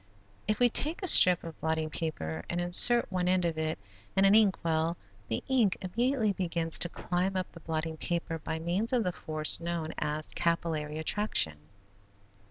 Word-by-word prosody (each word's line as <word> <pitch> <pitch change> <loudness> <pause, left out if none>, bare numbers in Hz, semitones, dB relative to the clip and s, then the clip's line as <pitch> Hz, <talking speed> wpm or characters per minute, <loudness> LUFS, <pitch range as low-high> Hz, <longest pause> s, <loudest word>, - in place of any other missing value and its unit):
If 215 0 0
we 245 - +5
take 310 - 0
a - - 0
strip 180 - +8
of 165 -1 -10
blotting 160 -1 -2
paper 80 - -4
and 175 - -2
insert 185 +8 +2
one 180 -1 -1
end 180 -1 +1
of 165 -1 -1
it 160 0 -2 0.4
in 195 - +4
an 195 - +5
ink 210 -3 +4
well, 165 +1 0 0.3
the 110 - -3
ink 240 -8 +1
immediately 225 +3 -1
begins 170 -3 -1
to 175 - +2
climb 185 +3 -3
up 185 -1 -3
the 170 - -13
blotting 160 0 -4
paper 165 -1 -3
by 160 - -5
means 180 +9 -2
of 245 -3 +2
the 180 - -1
force 155 -2 0
known 170 -1 -4
as 150 +1 -3
capillary 160 -3 -2
attraction. 160 - 0
170 Hz, 180 wpm, -29 LUFS, 160-195 Hz, 0.4 s, strip